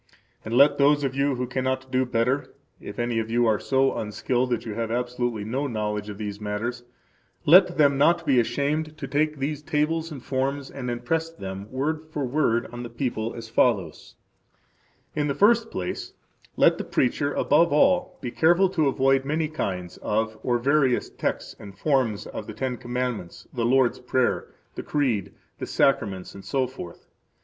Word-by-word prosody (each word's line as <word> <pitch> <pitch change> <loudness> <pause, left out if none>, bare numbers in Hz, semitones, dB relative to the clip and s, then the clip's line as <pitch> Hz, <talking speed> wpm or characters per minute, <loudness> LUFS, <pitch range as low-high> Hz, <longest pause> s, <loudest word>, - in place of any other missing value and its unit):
And 110 +2 -3
let 145 +1 +6
those 145 +1 +4
of 135 -2 -1
you 140 0 +1
who 125 0 -2
cannot 130 +1 -2
do 130 0 +1
better 125 +3 0 0.2
[If - - -9
any 120 -1 0
of 110 0 -3
you 120 +1 +2
are 110 -3 +2
so 135 +6 +1
unskilled 120 +4 -1
that 120 -2 -1
you 110 - -4
have 115 +1 -3
absolutely 120 -2 -2
no 135 +6 -2
knowledge 105 -3 -3
of 105 - -7
these 105 -1 -5
matters, 110 +4 -3 0.6
let 180 +2 +6
them 140 -3 +4
not 170 +3 +4
be 135 -4 +4
ashamed 145 +6 -1
to] - - -5
take 150 +1 0
these 145 +2 -3
tables 160 +2 0
and 140 -5 -8
forms 135 +1 -2
and 125 -3 -5
impress 160 +8 -1
them, 95 -9 -7
word 155 +4 -2
for 150 -3 -2
word, 125 -3 +1
on 120 - -6
the 120 - -6
people, 115 -2 -3
as 115 -1 -7
follows:– 105 -7 0 1.0
In 150 -1 0
the 140 - -1
first 230 +2 +4
place, 90 - -5 0.4
let - - +4
the - - -2
preacher 140 +3 0
above 160 +3 +3
all 270 - +3
be 120 - -4
careful 175 +6 +4
to 160 -5 +1
avoid 135 0 +2
many 155 +3 0
kinds 90 - -4
of 110 +1 -1
or 120 -1 +1
various 135 0 +2
texts - - -3
and 100 -2 -11
forms 130 -6 +1
of 105 - -7
the - - -6
Ten 125 +3 -2
Commandments, 120 -7 -4
the 120 -2 -1
Lord's 130 0 +3
Prayer, 125 0 0 0.3
the - - -5
Creed, 125 -10 -1 0.3
the - - -4
Sacraments, 100 -10 0
etc. 120 -1 -3
130 Hz, 175 wpm, -25 LUFS, 115-145 Hz, 1.0 s, let